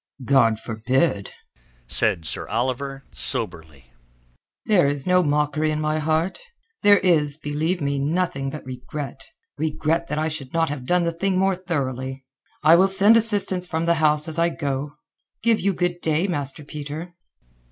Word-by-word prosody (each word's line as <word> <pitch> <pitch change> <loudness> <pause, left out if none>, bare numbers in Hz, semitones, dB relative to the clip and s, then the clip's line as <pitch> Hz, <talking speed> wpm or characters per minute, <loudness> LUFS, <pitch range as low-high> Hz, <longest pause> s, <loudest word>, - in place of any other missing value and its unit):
"God 115 -4 +4
forbid!" 115 -1 0 0.6
said 90 - 0
Sir - - -3
Oliver 130 +4 -2
soberly. 70 0 -4 0.7
"There 185 -9 +4
is 140 -1 -1
no 180 0 +4
mockery 150 0 +1
in 155 0 -1
my 155 0 0
heart. 160 +4 0 0.4
There 205 0 +7
is, 155 -6 +2
believe 155 +4 -2
me, 140 -1 -1
nothing 145 -2 -1
but 150 +1 -8
regret—regret 155 - -4
that 150 - -3
I 155 +1 0
should 150 -3 -5
not 165 -2 +2
have 135 -3 -6
done 180 0 +3
the 170 - 0
thing 190 +2 0
more 190 +1 +3
thoroughly. 135 -7 -4 0.4
I 160 +2 +7
will 190 +2 +5
send 195 +3 +5
assistance 205 -5 +3
from 160 -1 -2
the 170 - +4
house 150 0 +3
as 160 +1 -3
I 170 +1 +3
go. 145 -2 -3 0.5
Give 230 -1 +3
you 200 - +1
good 175 -1 -2
day, 160 +3 +1
Master 145 -4 -3
Peter." 150 +4 -7
155 Hz, 155 wpm, -23 LUFS, 135-175 Hz, 0.7 s, There